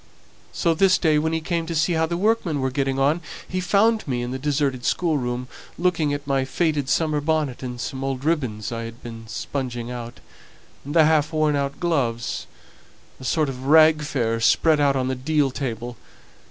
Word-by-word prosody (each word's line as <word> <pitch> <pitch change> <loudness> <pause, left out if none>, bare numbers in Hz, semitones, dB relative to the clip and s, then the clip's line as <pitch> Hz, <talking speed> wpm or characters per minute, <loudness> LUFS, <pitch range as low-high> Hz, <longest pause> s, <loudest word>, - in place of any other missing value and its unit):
So 170 -2 +1
this 185 +3 +4
day, 155 -3 +3
when 160 +1 0
he 160 0 -1
came 165 0 -2
to 165 - -3
see 160 +3 +2
how 160 0 +1
the 170 +1 -2
workmen 195 -6 +1
were 130 0 -1
getting 135 0 -1
on, 145 +5 +2 0.3
he 185 - -2
found 215 +3 +2
me 125 -3 -1
in 120 - -4
the 130 - -4
deserted 140 -3 0
schoolroom, 125 -8 0 0.3
looking 170 -4 +1
at 145 0 -3
my 135 -1 +1
faded 145 0 -1
summer 150 +1 +1
bonnet 150 -4 -1
and 125 -2 -6
some 135 +1 -4
old 135 0 -3
ribbons 125 -11 -1
I 115 0 -4
had 115 +1 -10
been 115 -1 -9
sponging, 120 0 -4
and 120 +4 -11
half 155 -1 +4
worn 155 -2 +2
out 140 0 -2
gloves 130 -9 -1 0.7
a - - -11
sort 155 +4 +1
of 130 -1 -6
rag 155 +1 +6
fair 120 -6 -1
spread 150 +7 +3
out 140 -1 +3
on 130 -1 0
the 130 - 0
deal 140 +2 +1
table. 120 -3 -4
145 Hz, 185 wpm, -23 LUFS, 125-160 Hz, 0.7 s, rag